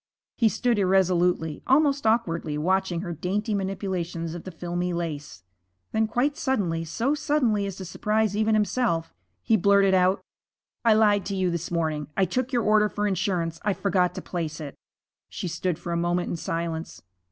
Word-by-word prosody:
He 230 -3 +3
stood 235 0 +1
irresolutely, 180 -4 +2
almost 280 -2 +3
awkwardly, 170 -9 0
watching 185 +1 0
her 175 -2 -4
dainty 205 +7 -2
manipulations 185 -4 -3
of 175 - -8
the 185 - -6
filmy 175 +1 -3
lace. 150 - -5 0.5
Then 220 0 +1
quite 265 +6 0
suddenly, 190 - -1
so 235 - 0
suddenly 245 -9 +1
as 195 - -5
to 190 - -7
surprise 210 +3 0
even 220 +1 +2
himself, 210 -5 0 0.3
he - - +3
blurted 200 0 +4
out, 185 +1 +3 0.6
'I 230 -2 +6
lied 205 -3 +3
to 200 - -2
you 185 -2 +1
this 170 0 -3
morning. 155 -4 -1
I 195 - +4
took 255 +8 -2
your 240 -3 +1
order 210 0 +4
for 205 0 -2
insurance. 180 -4 -1
I 205 - +1
forgot 185 -3 +1
to - - -6
place 165 -3 -4
it.' 145 -3 -6 0.6
She - - -5
stood 170 0 -2
for 175 - -6
a 170 - 0
moment 175 +1 0
in - - -1
silence. 165 0 -4
190 Hz, 175 wpm, -26 LUFS, 170-215 Hz, 0.6 s, I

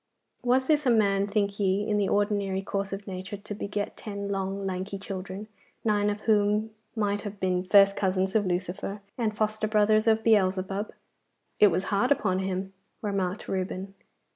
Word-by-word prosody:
Was 255 +1 +2
this 300 -1 +2
a - - +5
man, 200 -3 +3
think 200 -1 0
ye, 200 +1 +1
in 210 - +1
the 200 -2 +1
ordinary 200 -2 0
course 200 0 -2
of 195 +1 -5
nature 190 +1 -6
to 205 +1 -7
beget 205 0 -3
ten 200 -1 -5
long 195 0 -2
lanky 190 +1 -3
children, 195 +1 -6 0.4
nine 210 -1 +2
of 205 0 -3
whom 210 0 +2 0.2
might 205 -2 0
have 205 -1 -7
been 180 -1 0
first 195 +1 +6
cousins 190 0 0
of 205 -3 +3
Lucifer, 190 +3 -3
and 220 -3 -1
foster 215 0 0
brothers 215 +1 +3
of 220 0 +4
Beelzebub?' 195 -1 +2 0.7
'It 210 - +8
was 185 0 +1
hard 225 +7 +2
upon 190 -9 +2
him,' 190 0 -3 0.3
remarked 195 -2 -2
Reuben. 190 +1 -3
200 Hz, 165 wpm, -27 LUFS, 190-210 Hz, 0.7 s, It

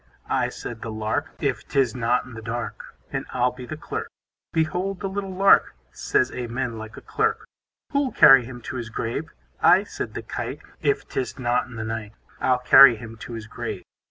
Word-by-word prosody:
I, - - +2
said 115 -2 -7
the 115 - -5
Lark, 110 +8 -2
If 140 -4 -2
'tis 135 -5 +2
not 125 0 +1
in 125 - -12
the 115 - -8
dark, 120 +2 -6 0.2
And - - -3
I'll 125 0 +2
be 125 0 -10
the 155 - -6
Clerk. - - -5 0.4
Behold 180 +4 -1
the 195 - -2
little 195 0 -4
Lark, 195 - +5 0.2
Says 130 - +1
Amen 120 -1 -3
like 110 0 -9
a - - -9
Clerk. 445 +1 -1 0.5
Who'll 280 -2 +1
carry 135 -3 +8
him 120 0 -9
to 130 - -6
his 115 -2 -5
grave? 115 +1 -3 0.3
I, - - +6
said - - -6
the - - -4
Kite, - - -5 0.2
If - - 0
'tis 130 - -3
not 120 -2 0
in 125 - -11
the 110 - -4
night, 110 -1 -5 0.3
I'll 130 -1 +3
carry 125 0 +8
him 115 0 -9
to 120 - -8
his 115 -2 -6
grave. - - -6
125 Hz, 195 wpm, -24 LUFS, 115-145 Hz, 0.5 s, carry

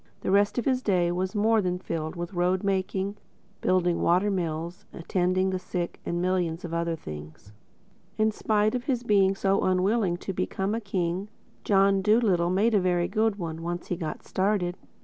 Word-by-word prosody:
The - - -1
rest 205 +3 +3
of 245 - 0
his 255 -2 +1
day 180 -6 +2
was 185 +3 -2
more 220 +1 +3
than 180 -1 -1
filled 160 -3 -4
with 175 +2 -5
road 180 +2 +1
making, 195 +1 -1 0.4
building 180 -2 +2
water 185 +4 +3
mills, 170 -1 -3
attending 185 +2 0
the 185 - -2
sick 180 -1 -4
and 170 - -2
a - - -1
million 180 -2 0 0.2
other 170 0 0
things. 75 - -10 0.6
In 215 0 +3
spite 215 0 +1
of 250 -1 -3
his 250 -4 -1
being 195 -4 +3
so 195 0 +1
unwilling 185 0 +1
to 195 - -5
become 190 +2 -2
a 230 - -2
king, 190 -1 -2 0.3
John 195 -1 +3
Dolittle 200 -5 +3
made 205 +6 +2
a 205 - +5
very 175 -1 +1
good 220 -1 +1
one—once 170 0 -5
he 180 - 0
got 165 -3 -5
started. 190 -2 0
185 Hz, 175 wpm, -27 LUFS, 175-205 Hz, 0.6 s, a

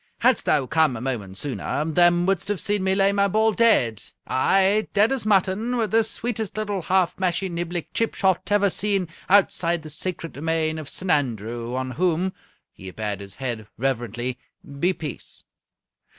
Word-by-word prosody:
"Hadst 250 0 +3
thou 145 -3 +3
come 155 -3 +2
a - - -6
moment 110 -7 -4
sooner, 145 +3 -3
them 175 +2 +3
wouldst 190 -1 0
have 205 -3 -1
seen 205 -1 -1
me 190 0 +2
lay 195 0 +3
my 200 0 +2
ball 220 +3 +2
dead 130 - +3 0.2
aye, 195 +9 +2
dead 210 +3 +4
as 260 -5 -1
mutton, 205 +4 +2
with 220 -4 0
the 225 0 +4
sweetest 220 -1 -4
little 205 -3 -2
half 185 +1 +1
mashie 185 +1 0
niblick 175 0 -4
chip 230 - 0
shot 190 -1 +1
ever 205 -1 +3
seen 195 -2 0 0.2
outside 175 -4 +3
the 155 - -7
sacred 165 +1 -4
domain 160 +1 -1
of 155 - -8
S'nandrew, 120 - -2
on 130 0 -2
whom" 180 +4 0 0.4
he 95 - -10
bared 105 0 -4
his 100 -1 -10
head 120 -5 -4
reverently 120 0 -2 0.4
"be 180 +4 +3
peace! 155 -6 -7
175 Hz, 165 wpm, -24 LUFS, 130-200 Hz, 0.4 s, dead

